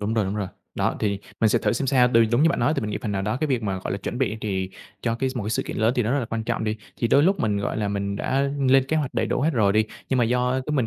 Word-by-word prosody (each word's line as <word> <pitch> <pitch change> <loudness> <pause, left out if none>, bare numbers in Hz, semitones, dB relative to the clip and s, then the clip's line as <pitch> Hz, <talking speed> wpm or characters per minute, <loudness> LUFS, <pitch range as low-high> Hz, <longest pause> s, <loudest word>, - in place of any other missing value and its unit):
Đúng 105 +2 -1
rồi, 110 -3 +2
đúng 95 +2 -3
rồi. 100 -3 -2 0.3
Đó, - - 0
thì 100 -2 0 0.2
mình 110 - +5
sẽ - - +3
thử - - +1
xem 135 +4 -1
sao, 125 -2 +4
đ 120 - +2 0.2
đúng 120 +5 +4
như 165 - +6
bạn - - -1
nói 155 - +3
thì - - +1
mình 105 - -3
nghĩ 105 - -2
phần 105 - -2
nào 95 - -1
đó, 105 +3 -1
cái 155 - +1
việc 125 -4 0
mà, 95 -2 -2
gọi 95 - -4
là, 100 - -2
chuẩn 100 - -5
bị 115 -5 0
thì 95 -3 -2 0.3
cho 115 -1 0
cái 130 +3 -1
một 120 - -2
cái 105 - -2
sự 110 - 0
kiện - - -5
lớn 110 +2 +2
thì 125 - +3
nó 115 +3 0
rất 145 - +2
là 125 - -1
quan 115 0 -4
trọng 115 -1 -1
đi. 110 0 -1 0.2
Thì 115 - 0
đôi 140 - +5
lúc 190 +2 +2
mình, 105 -2 +1
gọi 100 - -2
là, 105 -2 -1
mình 100 0 -2
đã 135 +6 0 0.2
lên 135 0 +5
kế 160 - 0
hoạch 150 -4 -2
đầy - - +1
đủ - - -1
hết 150 +4 +2
rồi 105 -6 +3
đi, 110 +1 +3 0.2
nhưng 130 - +1
mà 120 - +4
do 125 +2 +1
cứ 150 - -2
mình 130 -6 +1
115 Hz, 360 wpm, -24 LUFS, 105-130 Hz, 0.3 s, như